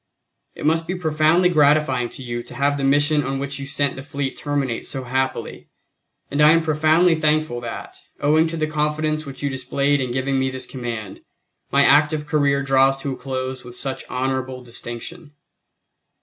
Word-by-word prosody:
It - - -7
must 165 +2 +2
be 185 - -2
profoundly 160 +1 +3
gratifying 145 -6 +3
to 130 - -9
you 120 -1 -4
to - - -12
have 140 +1 +1
the 140 - -3
mission 145 +2 +3
on 135 +1 -2
which 140 +1 -3
you 135 - -6
sent 140 -1 0
the 135 - -7
fleet 140 -1 -4
terminate 140 -5 -2
so 135 - -5
happily, 130 +1 -3 0.6
and 145 +1 +1
I 150 +1 +8
am 165 - +4
profoundly 160 +3 +3
thankful 155 -5 +1
that, 120 -1 -7 0.2
owing 155 +3 +3
to 165 +1 -4
the 155 - +1
confidence 155 0 -1
which 135 +1 -8
you 140 - +1
displayed 140 +2 0
in 130 - -2
giving 130 +2 0
me 130 0 +1
this 130 0 -6
command, 115 -6 -6 0.5
my 140 0 +5
active 150 +1 +4
career 140 -2 +1
draws 135 0 +3
to 140 - -2
a - - -3
close 130 -1 -4
with 120 -1 -10
such 135 +1 -4
honorable 130 0 -2
distinction. 125 +7 -8
140 Hz, 180 wpm, -22 LUFS, 130-155 Hz, 0.6 s, I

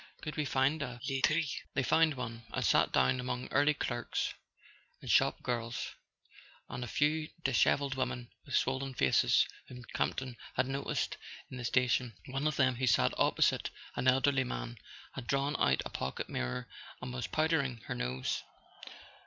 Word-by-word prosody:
Could 150 - -4
we 150 - 0
find 140 +3 +2
a 125 -3 -4
laiterie 150 +4 +2
f 145 - -4 0.2
" - - -49
They 135 - +2
found 160 +3 +4
one, 115 -2 -5
and - - -1
sat - - +4
down 65 - +3
among 125 0 -3
early 145 +2 +4
clerks 120 -4 -2 0.7
and - - -3
shop - - +3
girls, 120 -1 -2 0.8
and 125 - -5
a - - -4
few 155 +4 +1
dishevelled 135 +2 +3
women 125 -2 -3
with 140 - -3
swollen 135 0 0
faces 65 - +4 0.2
whom 125 -1 -10
Campton 130 -2 -1 0.2
had - - +2
noticed 135 +2 -2 0.3
in 130 - -6
the 125 - -5
sta¬ 125 +2 +3
tion. 120 -3 0
One 135 +3 -1
of 155 - 0
them, 130 -3 +3
who 130 +1 0
sat 80 - +4
opposite - - +2 0.3
an 130 - 0
elderly 130 +1 +4
man, - - -5 0.3
had 125 -3 -7
drawn 140 +3 +1
out 65 -1 +3
a - - -5
pocket 65 - -3
mirror 120 - -3 0.3
and 130 -1 -6
was 125 -2 -3
powdering 155 -7 +1
her - - -3
nose. 65 +1 -2
130 Hz, 170 wpm, -33 LUFS, 120-140 Hz, 0.8 s, found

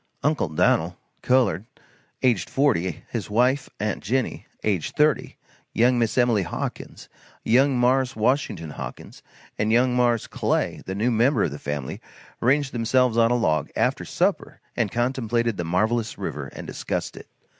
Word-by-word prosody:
"Uncle 150 - +1
Dan'l" 75 - +1 0.2
(colored,) 120 -8 +2 0.6
aged 120 -7 +2
40; 105 - 0
his 110 -6 -4
wife, 125 +5 +2
"aunt 105 -1 -2
Jinny," 130 +6 -2 0.2
aged 95 -7 -1
30, 150 0 +1 0.4
"Young 120 +2 +3
Miss" 115 0 0
Emily 120 -4 +3
Hawkins, 90 - -6 0.4
"Young 130 +3 +3
Mars" 130 +1 +2
Washington 105 - 0
Hawkins - - -8 0.4
and 105 +1 +1
"Young 125 +2 +3
Mars" 120 -2 +2
Clay, - - -1
the 95 - -3
new 115 +5 +1
member 120 +1 +3
of - - 0
the 70 - -7
family, 70 -3 -5 0.4
ranged 135 +2 +2
themselves 120 +1 +2
on 115 0 +4
a 120 - +2
log, 80 -10 +1
after - - +1
supper, - - -1 0.2
and - - 0
contemplated 120 -2 0
the 85 - -2
marvelous 110 +7 0
river 70 -1 -4
and - - -9
discussed - - -4
it. - - -11
120 Hz, 150 wpm, -24 LUFS, 105-130 Hz, 0.6 s, on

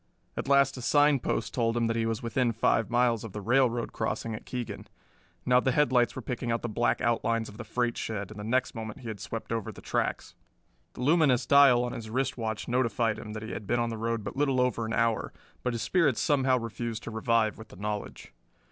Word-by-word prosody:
At - - -4
last 140 -1 +4
a - - -6
sign 145 +2 +4
post - - -2
told 115 -1 +1
him 115 - +2
that 115 0 0
he 115 -1 0
was 115 +2 -2
within 115 +1 +1
five 115 0 +1
miles 120 -2 +2
of 110 -4 -8
the 105 - -4
railroad 120 +2 +1
crossing 110 +1 -2
at 110 - -8
Keegan. 125 -2 -5 0.6
Now 125 0 +5
the 130 0 +1
headlights 125 -4 +3
were 130 - -6
picking 120 +1 -3
out 115 - -1
the - - -1
black 120 +2 0
outlines 115 -1 +1
of 105 - -12
the 120 - -6
freight 120 0 -1
shed, 105 -2 -4
and 110 - -9
the - - -5
next 125 +4 0
moment 110 0 -7
he 120 - -6
had 105 -2 -6
swept 110 +3 -6
over 115 -3 -2
the - - -12
tracks. - - -2 0.6
The - - -8
luminous 145 -3 +3
dial 140 -4 +6
on 125 - -2
his 110 -1 -7
wrist 130 +2 -1
watch 110 -3 -4
notified 115 -3 +1
him 105 -1 -8
that 110 0 -6
he 110 - -6
had 105 - -6
been 120 +2 +1
on 120 0 0
the - - -3
road 115 -1 -1
but 100 - -6
little 135 -2 +1
over 125 -3 +1
an 110 - -3
hour, 115 -1 0 0.3
but 125 - -1
his 115 0 -3
spirits 145 +1 +2
somehow 135 -3 +3
refused 115 -1 -4
to - - -6
revive 110 -1 +1
with 110 - -10
the - - -14
knowledge. 105 -6 -5
115 Hz, 235 wpm, -28 LUFS, 110-125 Hz, 0.6 s, dial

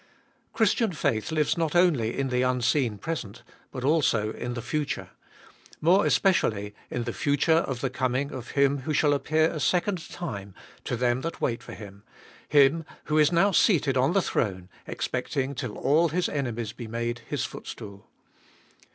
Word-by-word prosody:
Christian 220 -2 +2
faith 120 -5 -1
lives 155 +1 +1
not 160 -1 0
only 155 -11 +3
in 135 -1 0
the 125 0 +1
unseen 125 -2 +1
present 115 -4 -5 0.3
but 130 - -6
also 130 -8 +2
in 120 +1 -5
the 120 - -4
future; 150 +4 -3 0.7
more 180 +6 +4
especially 105 - +2 0.2
in 120 - -2
the 120 -1 -4
future 145 +3 +2
of 130 -3 -4
the 135 - 0
coming 130 +2 -1
of 125 -3 -7
Him 140 0 +3
who 145 +4 -3
shall 145 -1 +3
appear 155 +3 +2
a 155 - -4
second 180 +2 0
time 100 - -6 0.3
to - - -1
them 120 +1 +1
that 165 +3 -5
wait 115 -1 -1
for - - -10
Him, 100 -2 -11 0.5
Him 145 +3 +5 0.2
who 155 0 +1
is 150 +2 +5
now 185 +4 +4
seated 160 - +3
on 130 +5 +2
the 195 -1 +3
throne, 95 -5 -2 0.2
expecting 135 0 -2
till 125 -5 -5
all 160 +5 +3
His 175 +3 0
enemies 120 -6 -3
be 120 - -8
made 120 +1 -3
His - - -2
footstool. 100 -1 -9
135 Hz, 170 wpm, -26 LUFS, 120-160 Hz, 0.7 s, Him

